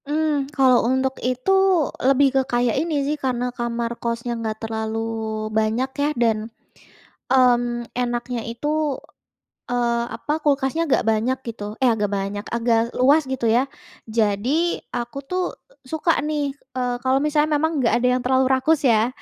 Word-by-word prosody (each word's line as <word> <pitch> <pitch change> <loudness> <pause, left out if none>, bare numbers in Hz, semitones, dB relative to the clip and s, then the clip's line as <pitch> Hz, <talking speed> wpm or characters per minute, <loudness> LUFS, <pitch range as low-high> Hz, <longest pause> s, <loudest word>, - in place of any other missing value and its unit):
Mmm, 295 -2 0
kalau 260 -2 +5
untuk 260 0 +1
itu, 255 +8 0 0.5
lebih 275 +2 +4
ke 270 - +4
kayak 240 -1 +1
ini 305 -4 -1
sih, 300 +2 -1
karena 250 -1 -1
kamar 235 -1 -2
kosnya 235 +1 -2
nggak 220 -1 -3
terlalu 220 0 -3 0.6
banyak 220 +4 +1
ya 290 - +2
dan, 230 -2 +2 1.0
mmm, 240 -2 +3
enaknya 240 0 -2
itu, 235 +6 -4 1.0
eee, 235 -1 +1
apa, 295 - -3
kulkasnya 285 +2 +1
agak 295 - +2
banyak 225 +4 +1
gitu 225 -2 -6 0.2
eh 260 - +4
agak 210 -2 -1
banyak, 200 +1 -3
agak 230 0 +1
luas 285 +5 +5
gitu 255 -3 -1
ya. 255 - +3 0.5
Jadi 235 +11 +1 0.2
aku 240 +1 -5
tuh 365 0 -1 0.5
suka 320 +2 +1 0.2
nih, 295 -2 -1 0.2
eee, 250 -1 0
kalau 260 +1 +2
misalnya 300 0 +2
memang 320 +2 +1
nggak 230 -3 +2
ada 240 +1 +1
yang - - -2
terlalu 260 +1 +3
rakus 265 +5 +3
ya, 225 -2 +4
250 Hz, 150 wpm, -22 LUFS, 235-275 Hz, 1.0 s, kalau